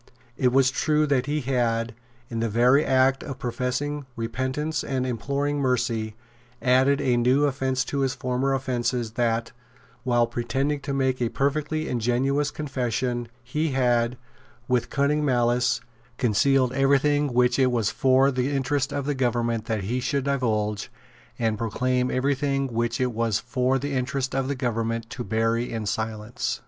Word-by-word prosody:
It 125 -2 +2
was 130 0 +4
true 150 +2 +2
that 135 -2 +1
he 150 +1 0
had, 120 -3 0 0.3
in 115 -1 -4
the 115 0 0
very 125 +6 +4
act 130 0 +3
of 135 -3 -6
professing 130 +4 -3
repentance 130 +6 -2
and 130 -2 -1
imploring 140 +4 -1
mercy, 120 -5 0 0.4
added 130 +2 +3
a 130 -4 +2
new 125 +4 +3
offence 130 -2 0
to 140 - -3
his 135 -1 0
former 130 +1 0
offences, 125 -3 -1
that, 115 0 0 0.5
while 120 -2 +3
pretending 130 +5 -1
to 140 0 -4
make 130 -2 0
a 120 - +1
perfectly 150 +4 -1
ingenuous 130 +5 +1
confession, 125 -4 -2 0.2
he 150 +4 -1
had, 120 -2 +2 0.5
with 125 -2 +1
cunning 145 +1 +1
malice, 120 -2 +2 0.4
concealed 130 +2 +2
every 135 +1 +4
thing 145 0 +1
which 125 +1 +2
it 130 -1 +4
was 115 -4 +1
for 135 +1 +3
the 130 0 0
interest 140 0 0
of 140 -1 -2
the 145 - 0
government 120 -3 0
that 110 -4 -2
he 120 +6 -1
should 140 +2 -1
divulge, 110 -7 -1 0.5
and 110 -3 0
proclaimed 125 +3 0
every 135 +2 +1
thing 135 0 0
which 115 +3 -1
it 125 -1 +1
was 115 -2 0
for 130 0 0
the 140 +2 -3
interest 130 +1 -1
of 135 -1 0
the 140 - -1
government 115 -2 -2
to 125 - -5
bury 115 +1 0
in 110 -2 -3
silence. 110 +1 -3
125 Hz, 160 wpm, -25 LUFS, 120-135 Hz, 0.5 s, was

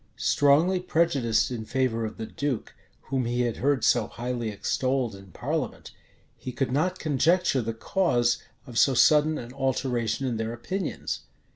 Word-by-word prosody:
Strongly 155 +6 +3
prejudiced 145 -11 +1
in 115 -3 -4
favor 115 -1 0
of 110 - -6
the 110 - -4
duke, 140 -1 -3 0.4
whom 130 -2 +1
he 120 +1 0
had 120 -2 -1
heard 140 0 +1
so 120 -3 +3
highly 120 -1 -3
extolled 130 +3 -1
in 100 0 -13
parliament, 90 - -4 0.5
he 125 - -5
could 130 0 -2
not 180 +7 +1
conjecture 160 -1 +2
the 115 0 -2
cause 120 -5 +1 0.2
of 120 -2 -2
so 135 - +4
sudden 155 +4 +5
an 120 +1 -8
alteration 130 -3 -1
in 120 -3 -1
their 110 +1 -3
opinions. 185 +10 -4
130 Hz, 155 wpm, -26 LUFS, 115-145 Hz, 0.5 s, sudden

